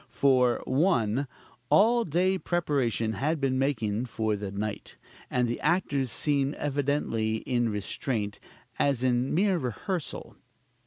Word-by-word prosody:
For, 125 -1 +3
1. 135 - +1 0.4
All 230 +3 +4
day 185 +4 +1
preparation 135 -11 0
had 150 +9 -1
been 130 -1 0
making 120 -5 0
for 110 -2 -1
the 100 -1 -5
night; 105 +1 -5 0.3
and 125 -1 +1
the 120 - -3
actors 145 -5 +1
seemed 140 +2 0
evidently 140 -6 -1
in 120 -2 +1
restraint, 105 +1 -3 0.4
as 135 -3 +2
in 125 +1 +1
mere 190 +1 +2
rehearsal: 150 - -4
2. - - -34
130 Hz, 125 wpm, -28 LUFS, 115-150 Hz, 0.4 s, All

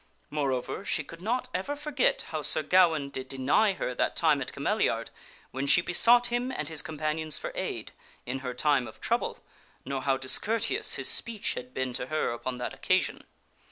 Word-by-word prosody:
Moreover, 140 +3 -2
she 155 - -1
could 165 +4 -12
not 245 +5 -1
ever 195 +11 -2
forget 290 -3 0
how 155 -1 -3
Sir 155 - +4
Gawaine 160 -4 +3
did 130 -1 -5
deny 135 +11 +2
her 125 - -3
that - - 0
time - - +3
at - - -4
Cameliard - - 0 0.4
when 135 +2 -3
she 155 - +7
besought 235 +8 +4
him 245 +2 0
and 150 - -4
his 160 -1 -1
compan 155 0 -3
ions 155 -1 -1
for - - -5
aid, - - -4 0.3
in 130 +2 -3
her 125 -2 -5
time 140 -2 +2
of - - -12
trouble, - - -1 0.4
nor 135 0 -3
how 135 0 +1
discourteous 215 - +1
his - - -1
speech 225 -3 +1
had 125 0 -7
been 130 -1 -2
to 125 - -3
her 155 -3 0
upon 125 +2 -4
that 125 - -4
occasion. - - 0
155 Hz, 190 wpm, -28 LUFS, 130-195 Hz, 0.4 s, she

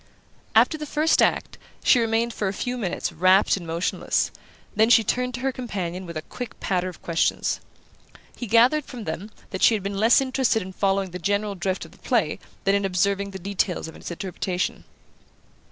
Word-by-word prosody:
After 310 - +4
the 300 - -5
first 310 +3 +2
act - - +1 0.2
she 250 - +5
remained 230 0 +1
for 205 - -2
a 190 - -1
few 245 +5 -3
minutes 195 -8 -2
rapt 185 +4 +4
and 180 -4 -7
motionless; 165 +2 0 0.4
then 220 +1 +4
she 235 -2 +6
turned 250 +3 -1
to 250 - -6
her 270 +1 +1
companion 190 -8 -4
with 170 -1 -6
a 155 - -5
quick 245 +5 -8
patter 185 -1 -1
of 180 - -13
questions. 170 -1 0 0.8
He 245 - -6
gathered 245 +7 +4
from 240 -3 -8
them 175 +4 -5 0.2
that 190 - -4
she 230 - +6
had 205 - -4
been 200 0 -3
less 225 +3 +6
interested 260 -5 +1
in 190 +1 -9
following 195 -1 0
the 180 - -6
general 205 +3 0
drift 185 -1 -2
of 165 - -14
the - - -20
play 220 - 0 0.2
than 195 - +3
in 200 0 +2
observing 200 +1 +1
the 195 - -7
details 190 -2 -2
of 160 - -10
its - - -8
interpretation. 180 +1 -3
200 Hz, 195 wpm, -24 LUFS, 185-235 Hz, 0.8 s, she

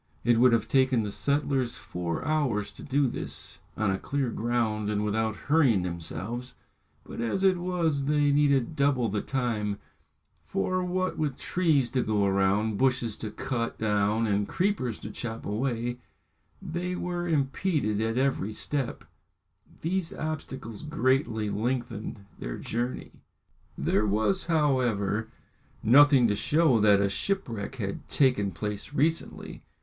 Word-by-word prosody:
It 120 -1 +4
would 125 +1 +6
have 115 -2 +2
taken 130 -3 +3
the 105 - -3
settlers 140 -1 0
four 85 -2 -4
hours 135 -9 0
to - - -13
do 140 +1 +1
this, - - -6 0.2
on 110 -2 +1
a 95 - -1
clear 135 -4 -1
ground 110 -2 0
and 105 0 0
without 110 +1 0
hurrying 135 - +4
themselves; 90 +8 -5 0.5
but - - -7
as 120 +12 -1
it 190 -2 +4
was 170 -6 0
they 145 0 +3
needed 140 -1 +2
double 140 -5 +2
the 105 +1 -1
time, 110 -6 -1 0.7
for 185 - -1
what 185 +1 -1
with 145 -4 -1
trees 155 -9 +1
to 130 - +1
go 105 -3 +1
round, 100 +2 +1
bushes 125 -4 +1
to 110 - -5
cut 115 +2 -3
down, 105 +1 +1
and 100 -1 +1
creepers 175 - 0
to 105 - -6
chop 115 0 -6
away, 120 +2 -2 0.6
they 180 +2 -3
were 175 -1 -3
impeded 140 - 0
at 115 +1 -1
every 130 -6 0
step, 135 +3 -3 0.8
these 175 +1 -1
obstacles 135 -8 -5
greatly 130 -7 0
lengthening 115 -2 -3
their - - -5
journey. 120 +2 -3 0.7
There 105 - +1
was, 110 - +1
however, 120 - +1 0.5
nothing 135 +1 +7
to 105 - +1
show 145 +3 +3
that 105 -1 +5
a 100 - +3
shipwreck 115 - -2
had 100 -6 -5
taken 125 -8 +2
place 105 - -5
recently. 155 +3 -1
120 Hz, 140 wpm, -28 LUFS, 105-145 Hz, 0.8 s, nothing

